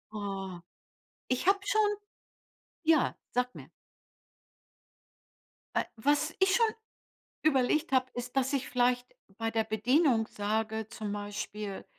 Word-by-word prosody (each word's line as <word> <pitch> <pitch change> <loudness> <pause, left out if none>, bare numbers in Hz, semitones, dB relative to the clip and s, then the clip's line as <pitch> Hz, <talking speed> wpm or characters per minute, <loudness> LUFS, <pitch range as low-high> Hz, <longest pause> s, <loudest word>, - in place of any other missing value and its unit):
Oh. 195 -3 -4 0.7
Ich 255 +7 0
habe 395 +1 +5
schon 425 +1 +3 1.0
ja, 315 -4 +4 0.2
sag 250 0 0
mir. - - -10 2.1
Äh. - - +3
Was 295 +6 +2
ich 380 0 +4
schon 465 - +5 0.8
überlegt 305 +2 +3
habe, 260 -1 +4
ist, 245 +1 -6
dass 265 +2 +2
ich 270 -2 -1
vielleicht 245 0 +2 0.3
bei 225 0 -1
der 225 -1 +2
Bedienung 225 +2 +3
sage, 220 +1 -2
zum 210 -2 -5
Beispiel, 205 0 -5
245 Hz, 115 wpm, -31 LUFS, 215-290 Hz, 2.1 s, habe